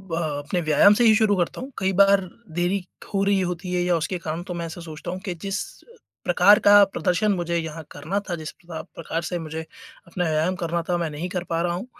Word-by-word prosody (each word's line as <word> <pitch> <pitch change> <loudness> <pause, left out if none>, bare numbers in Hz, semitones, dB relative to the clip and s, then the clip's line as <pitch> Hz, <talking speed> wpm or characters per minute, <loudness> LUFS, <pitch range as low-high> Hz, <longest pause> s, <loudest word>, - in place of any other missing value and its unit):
ब 190 -3 -7 0.2
अपने 145 +5 -2
व्यायाम 180 +7 +6
से 240 - +2
ही 220 -1 +7
शुरू 205 -2 +3
करता 175 -2 -1
हूँ। 260 +2 -7
कई 190 0 +1
बार 200 0 +6 0.4
देरी 175 +3 +2 0.4
हो 195 - +1
रही 200 -1 +2
होती 180 +1 -4
है 180 - +1
या 175 -1 +2
उसके 175 +3 -2
कारण 160 +2 -3
तो - - -2
मैं 170 - -3
ऐसा 165 +1 -8
सोचता 160 +1 -7
हूँ 185 +1 -5
कि 185 - -3
जिस 195 0 -2 0.3
अ, 470 - -19 0.3
प्रकार 180 +3 +6
का 205 - +8 0.2
प्रदर्शन 200 +3 +1
मुझे 170 0 -1
यहाँ 160 -1 -4
करना 160 +8 -3
था, - - 0
जिस 155 - -6
पता 170 -2 -9
प्रकार 165 0 -4
से 175 - -1
मुझे 160 +1 -4 0.5
अपना 175 +1 -2
व्यायाम 160 +4 +1
करना 170 +1 -1
था, 175 - +2
मैं 170 -2 -2
नहीं 155 +4 -4
कर 180 -1 -3
पा 165 0 0
रहा 175 - 0
हूँ, 185 +7 -5
175 Hz, 240 wpm, -24 LUFS, 165-195 Hz, 0.5 s, का